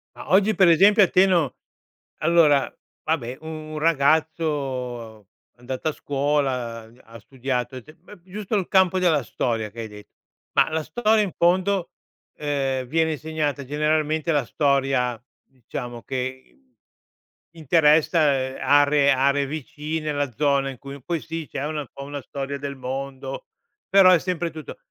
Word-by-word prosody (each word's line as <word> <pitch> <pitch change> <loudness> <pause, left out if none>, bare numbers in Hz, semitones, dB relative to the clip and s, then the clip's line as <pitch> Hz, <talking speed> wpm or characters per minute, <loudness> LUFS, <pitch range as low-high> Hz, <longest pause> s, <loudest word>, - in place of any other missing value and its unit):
Ma - - -9
oggi 205 +3 +4
per 190 -3 +5
esempio 200 +6 +6
a - - +4
te 185 +1 +5
no 165 - +1 0.6
allora 155 -4 +3 0.3
vabbè 130 -6 -2
u 160 - -10
un 155 -1 -6
ragazzo 140 - 0 0.3
andato 130 +5 -5
a - - -1
scuola 135 -5 -1 0.2
ha 115 +1 -13
studiato 125 +1 -4
e 130 - -8
te 155 +6 -17
uhm, 210 -4 -14
giusto 205 +3 -5
il 190 -3 0
campo 190 -1 +3
della 160 -6 +2
storia 115 -3 -2
che 115 - -11
hai 110 - -5
de 105 -1 -13 0.5
ma - - +4
la 160 0 -1
storia 220 +3 +2
in 195 - -3
fondo, 185 +1 +1 0.4
ehm, 135 -3 -2
viene 160 +5 +1
insegnata 150 -2 -3
generalmente 155 +2 0
la 145 -2 +1
storia 135 -5 0 0.3
diciamo 120 -1 -8
che 130 0 -4
in - - -29 1.0
interessa 155 +2 +4 0.4
aree 145 0 +4
aree 140 +1 +2
vicine 155 +1 -4
la 145 -3 -2
zona 140 +2 +1
in 135 - -8
cui 140 +2 -10
poi 170 0 -2
sì 165 -1 -6
c'è 140 - -4
una 150 0 -3
un 135 - -9
po' 140 - -9
una 145 0 -6
storia 140 +2 -5
del 140 0 -5
mondo 135 +1 -6 0.4
però 190 -1 +7
è 180 - +5
sempre 175 -1 -3
tutto 155 -2 -9
145 Hz, 155 wpm, -23 LUFS, 130-160 Hz, 1.0 s, però